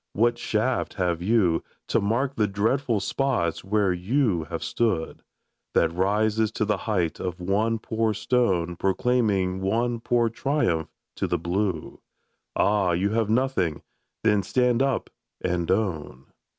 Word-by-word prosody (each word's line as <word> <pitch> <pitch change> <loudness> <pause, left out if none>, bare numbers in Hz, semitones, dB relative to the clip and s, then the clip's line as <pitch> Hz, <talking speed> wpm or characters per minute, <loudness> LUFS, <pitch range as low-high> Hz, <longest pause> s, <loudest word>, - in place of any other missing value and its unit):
What 120 +3 +2
shaft 120 +3 -1
have 90 -3 0
you, 95 -4 +2 0.3
To - - +2
mark 125 +7 0
the 105 -2 +2
dreadful 110 +4 0
spots 120 -6 -1
where 100 -1 +1
you 95 - 0
have - - -5
stood, 100 -9 -1 0.5
That 80 0 +3
rises 105 +4 +1
to 110 - 0
the 105 -1 +1
height 90 -6 0
of 90 -1 -4
one 105 +5 +1
poor 110 0 -1
stone 95 -8 +1
Proclaiming 95 -2 +1
one 115 +5 0
poor 120 0 +2
triumph 115 - 0 0.3
to - - -1
the - - 0
blue? 90 0 -2 0.5
Ah, 100 -4 +2
you 95 +4 +1
have 110 -1 +1
nothing! 110 - 0 0.4
Then 105 -2 +3
stand 125 +5 +1
up 135 -2 0 0.3
and 90 -2 -1
own! 85 - -1
105 Hz, 135 wpm, -25 LUFS, 90-115 Hz, 0.5 s, That